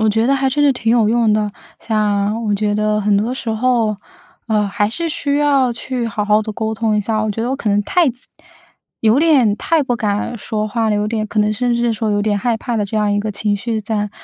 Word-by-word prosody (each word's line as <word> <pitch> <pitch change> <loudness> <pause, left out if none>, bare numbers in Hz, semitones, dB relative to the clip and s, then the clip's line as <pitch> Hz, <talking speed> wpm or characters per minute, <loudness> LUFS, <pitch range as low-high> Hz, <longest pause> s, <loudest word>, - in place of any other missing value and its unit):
我 220 - +3
觉 225 +2 +1
得 275 - +3
还 270 -1 +1
真 290 +2 +1
是 285 - +5
挺 230 -3 -1
有 230 -2 +3
用 230 -1 +2
的。 210 -1 0 0.3
像 210 0 0
我 210 -1 +1
觉 205 0 0
得 210 0 +1
很 205 0 +2
多 220 +5 0
时 255 -2 -5
候， 225 -1 +1 0.5
呃， 210 -1 +2
还 205 +1 -1
是 335 +8 -2
需 285 -2 -1
要 275 -4 +2
去 240 +1 -4
好 210 -2 -2
好 210 +1 +3
地 215 0 -5
沟 220 +1 -3
通 220 -1 0
一 - - +2
下。 215 +1 -1
我 215 - -1
觉 225 +2 -3
得 240 - -1
我 270 - -1
可 230 - -3
能 205 0 +2
太 355 - +2 1.0
有 225 +3 +3
点 275 -10 +4
太 325 +4 +1
不 245 -3 -1
敢 215 +1 -2
说 215 +1 -3
话 225 +1 0
了 215 - +1
有 210 0 0
点， 215 -1 -2
可 215 - -4
能 210 0 +2
甚 240 +3 0
至 235 - -1
是 240 -1 +2
说 220 -1 -2
有 205 0 +1
点 205 -1 0
害 235 +2 0
怕 235 +1 -3
的 210 - 0
这 205 +2 -4
样 210 -1 +1
一 205 - +1
个 215 +1 -3
情 205 0 -1
绪 225 +1 -3
在。 210 -1 -2
220 Hz, 280 characters per minute, -18 LUFS, 210-240 Hz, 1.0 s, 是